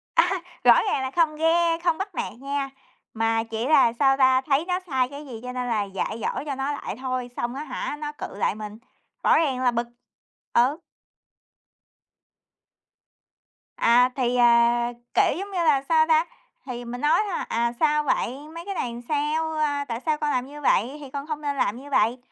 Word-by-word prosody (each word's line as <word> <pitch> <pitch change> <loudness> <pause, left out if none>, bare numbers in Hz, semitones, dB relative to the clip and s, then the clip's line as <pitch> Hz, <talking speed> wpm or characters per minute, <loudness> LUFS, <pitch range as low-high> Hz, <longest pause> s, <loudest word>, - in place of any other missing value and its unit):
A 335 - +7
ha, 370 0 -2 0.2
rõ 240 -1 +7
ràng - - 0
là 260 0 -3
không 325 -3 +3
ghe 330 +1 +2
không 340 -2 +2
bắt 390 -2 -5
nạt - - -3
nha. 275 0 -3 0.4
Mà 225 0 +1
chỉ 225 +1 -4
là, 280 -6 +5
sao 270 +2 +3
ta, 260 -1 +4
thấy 280 +3 +1
nó 360 0 -1
sai 260 -4 +1
cái 285 +2 -9
gì 245 -5 -8
cho 250 - -5
nên 250 0 -3
là 220 -3 0
dạy 200 +3 -4
dỗ - - -2
cho 285 -2 -3
nó 270 +2 -2
lại 290 - -5
thôi, 255 -1 -3
xong 240 +1 -2
á 285 - -4
hả, 285 0 -4
nó 295 -1 -4
cự - - -7
lại 205 - 0
mình, 210 0 -8 0.5
rõ - - +5
ràng 270 -6 +1
là 250 - +4
bực. 235 0 -2 0.7
Ừ. 265 +7 +3 3.0
À, 245 +2 +5
thì, 250 -2 0
à, 235 0 +4 0.3
kiểu, - - +3
giống 400 +2 -6
như 380 - -4
là, 295 -4 +4
sao 315 -1 +4
ta, 320 0 +4 0.4
thì 245 -2 -6
mình 245 +1 -6
nói 295 +7 +4
thôi: 370 - -3
"À, 235 +1 +1
sao 300 -1 +3
vậy? 265 -3 0 0.2
Mấy 335 +1 -7
cái 400 - -4
này 240 -8 -2
là 235 - -8
sao? 305 +2 0
A, 285 -2 0
tại 230 -3 -4
sao 310 -2 +1
con 300 0 -1
làm 250 -2 0
như 295 +1 -10
vậy? 270 0 +2
Thì 285 -2 -9
con 280 +1 -5
không 305 -1 -4
nên 285 -1 -2
làm 210 -3 0
như 285 - -11
vậy." 235 -2 +2
270 Hz, 205 wpm, -24 LUFS, 240-305 Hz, 3.0 s, A